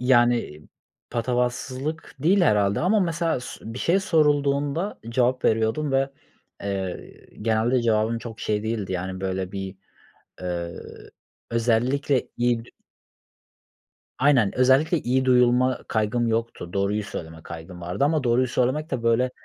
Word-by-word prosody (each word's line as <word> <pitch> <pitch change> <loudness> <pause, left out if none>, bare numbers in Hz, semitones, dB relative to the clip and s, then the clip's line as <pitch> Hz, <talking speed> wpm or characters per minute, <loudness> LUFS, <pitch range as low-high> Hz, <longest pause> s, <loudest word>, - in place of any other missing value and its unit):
Yani, 120 - +2 0.4
patavatsızlık 125 +5 -2
değil, 180 +8 +3
herhâlde 100 - +3
ama 205 +5 +3
mesela 165 -5 0
s 125 - -9
bir 125 - -5
şey 185 +4 +2
sorulduğunda 145 0 +1
cevap 125 +2 +1
veriyordum 115 +6 +1
ve, 135 0 +2 0.5
eee, 95 -2 -5 0.2
genelde 115 +3 +2
cevabım 115 0 +1
çok 115 -1 -9
şey 105 -1 -1
değildi, 110 -4 -2
yani, 95 +1 -4
böyle, 95 -1 -3
bir, 95 -1 -5 0.6
ııı, 85 -1 -4 0.7
özellikle 125 +4 +1
iyi 120 -1 +1
d - - -18 1.5
Aynen, 130 -6 +4
özellikle 135 +6 +4
iyi 130 +1 +1
duyulma 125 0 +4
kaygım 110 +2 0
yoktu, 115 -6 -2
doğruyu 100 +2 0
söyleme 80 -6 -8
kaygım 85 +2 -9
vardı 90 +9 -1
ama 150 -1 +1
doğruyu 125 +1 +3
söylemek 130 +6 0
de, 130 -4 -2
böyle, 115 +2 +2
120 Hz, 125 wpm, -24 LUFS, 105-135 Hz, 1.5 s, Aynen